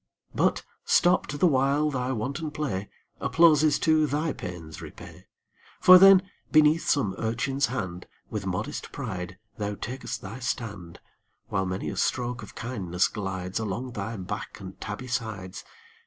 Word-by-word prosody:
But, - - +1 0.2
stopped 175 -4 +3
the - - +4
while 145 0 +3
thy 130 -1 -1
wanton 135 +6 -3
play, 135 -11 -3 0.3
Applauses 155 -3 +4
too 155 -1 +3
thy 150 +3 -1
pains 85 -4 -8
repay: - - -11 0.5
For 185 0 +9
then, 195 0 +8 0.3
beneath 155 +1 +4
some 115 -10 +2
urchin's 125 +5 0
hand 95 -8 -4 0.2
With 105 -3 -4
modest 105 +11 -3
pride 95 -9 -5 0.2
thou 105 -1 -2
takest 130 +6 -5
thy 105 +6 -7
stand, 105 -8 -4 0.5
While 95 -1 0
many 95 0 -3
a - - -7
stroke 125 -1 -1
of - - -11
kindness 95 -7 -1
glides 95 -2 -4
Along 110 +4 -3
thy 110 0 -4
back 105 +6 -6
and 95 -1 -10
tabby 105 +4 -5
sides. 110 -7 -4
120 Hz, 140 wpm, -27 LUFS, 95-145 Hz, 0.5 s, For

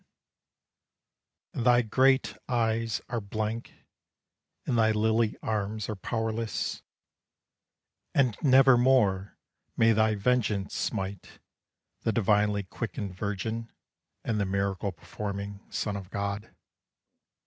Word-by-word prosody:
And 120 - -2
thy 120 0 +5
great 130 +4 +3
eyes 115 -2 0
are 120 -1 -2
blank, 110 +3 -4 0.8
And 125 - 0
thy 110 -1 +4
lily 110 +1 +2
arms 105 -1 -2
are 110 - -2
powerless, 110 +2 -2 1.3
And 130 -6 +3
nevermore 125 -7 +4 0.4
may 115 0 +5
thy 110 0 +3
vengeance 105 -3 0
smite 95 -3 -4 0.6
The 115 - +1
divinely 105 -1 +2
quickened 100 -1 -5
Virgin, 110 +4 -3 0.5
And 110 -2 -1
the 100 - +1
miracle 100 0 -1
performing 100 +2 -6
son 105 - -2
of 95 -2 -7
God. 100 +2 -3
110 Hz, 100 wpm, -28 LUFS, 100-115 Hz, 1.3 s, thy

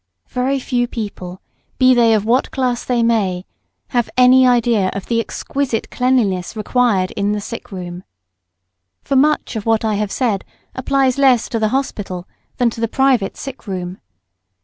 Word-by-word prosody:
Very 260 +2 0
few 245 -2 -1
people, 195 -6 -6 0.4
be 255 0 +5
they 230 -2 +4
of 210 -1 0
what 245 +4 +2
class 250 -2 -1
they 245 -2 0
may, 200 -6 0 0.4
have 240 -3 0
any 255 +1 +6
idea 235 -5 +2
of 200 - -5
the 230 -1 0
exquisite 245 +1 -3
cleanliness 235 -8 0
required 215 -3 +1
in 205 0 -1
the 210 - -2
sick 230 +2 -8
room. 180 -1 -7 1.0
For 275 - -1
much 295 -1 +2
of 220 0 -4
what 225 0 +2
I 215 - +1
have 205 -1 -2
said 225 -7 0 0.3
applies 265 0 +1
less 260 -4 +4
to 230 - -1
the 215 - +2
hospital 205 -8 -3 0.3
than 240 -2 +2
to 225 - -8
the 230 - +1
private 260 -4 +1
sick 270 -4 -8
room. 180 -1 -5
230 Hz, 165 wpm, -18 LUFS, 200-255 Hz, 1.0 s, any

